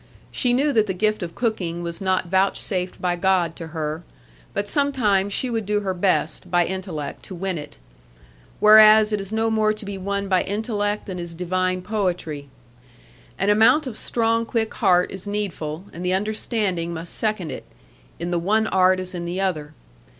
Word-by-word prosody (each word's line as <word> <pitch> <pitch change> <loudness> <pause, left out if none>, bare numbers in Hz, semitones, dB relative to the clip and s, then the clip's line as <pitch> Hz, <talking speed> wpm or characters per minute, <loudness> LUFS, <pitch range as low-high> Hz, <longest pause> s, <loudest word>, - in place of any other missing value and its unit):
She 250 - +1
knew 280 +4 +2
that 220 -2 +3
the 190 - -2
gift 215 +3 +1
of 170 -2 -5
cooking 180 -8 -2
was 170 +2 -5
not 185 -1 +1
vouchsafed 190 0 0
by 180 -1 0
God 175 -2 +1
to 165 - -6
her; 155 0 -4 0.5
but 205 - -2
sometimes 225 -10 +1
she 255 - 0
would 225 -4 -2
do 210 0 +1
her 190 -2 -1
best, 175 -2 0
by 175 -1 +3
intellect 180 -7 -5
to 190 - -8
win 185 -1 -3
it. 150 0 -10 0.8
Whereas 215 0 +8
it 205 - 0
is 195 +1 -7
no 225 0 +1
more 215 -1 +2
to 215 0 -8
be 200 -1 -5
won 200 +1 -2
by 185 -2 +3
intellect 205 0 -2
than 185 -2 -6
is 170 -1 -6
divine 185 +1 -1
poetry. 180 -8 -2 0.9
An 195 +2 +2
amount 225 +9 +5
of 255 -5 -5
strong 230 0 0
quick 225 -1 -1
heart 180 0 +3
is 195 +1 -8
needful, 185 -5 -3
and 175 - -7
the 180 0 +1
understanding 195 -4 -1
must 165 +1 -6
second 210 -8 -1
it, - - -7 0.5
in 175 - -4
the 175 - +1
one 215 +5 +2
art 185 -2 +3
as 185 0 -5
in 175 -1 -4
the 175 +2 -3
other. 160 -6 -2
190 Hz, 185 wpm, -23 LUFS, 175-215 Hz, 0.9 s, Whereas